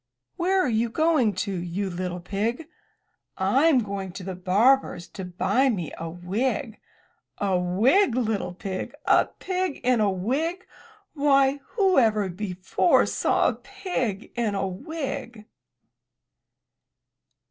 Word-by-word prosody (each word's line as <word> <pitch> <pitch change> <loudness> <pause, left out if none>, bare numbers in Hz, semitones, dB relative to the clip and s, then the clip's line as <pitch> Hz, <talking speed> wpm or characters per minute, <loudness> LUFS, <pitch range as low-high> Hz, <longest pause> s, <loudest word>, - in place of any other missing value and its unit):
* 125 - -57
Where 380 +2 +1
are 370 - +2
you 230 0 +1
going 290 - +2
to, 200 - -4
you 180 +2 -3
little 180 -1 -4
pig?" 225 - -2 0.7
"Fm 260 +7 +3
going 195 -2 -5
to 195 0 -7
the 190 +1 -4
barber's 190 +3 +2
to 190 - -7
buy 190 +9 +1
me 180 - -3
a 165 0 -6
wig!" 215 - -2 0.6
''A 190 -3 +1 0.2
wig, 265 - +4
little 215 -7 -1
pig! 190 0 -5
A - - +5
pig 370 -4 -3
in 250 -1 +3
a 210 - +3
wig! 275 - -2 0.5
Why, 280 -1 +3 0.2
whoever 235 - +3
before 185 - +1
saw - - +2
a - - -2
pig 240 - -4
in 225 -4 -1
a 195 0 -1
wig!" 255 - -6
220 Hz, 125 wpm, -25 LUFS, 190-270 Hz, 0.7 s, A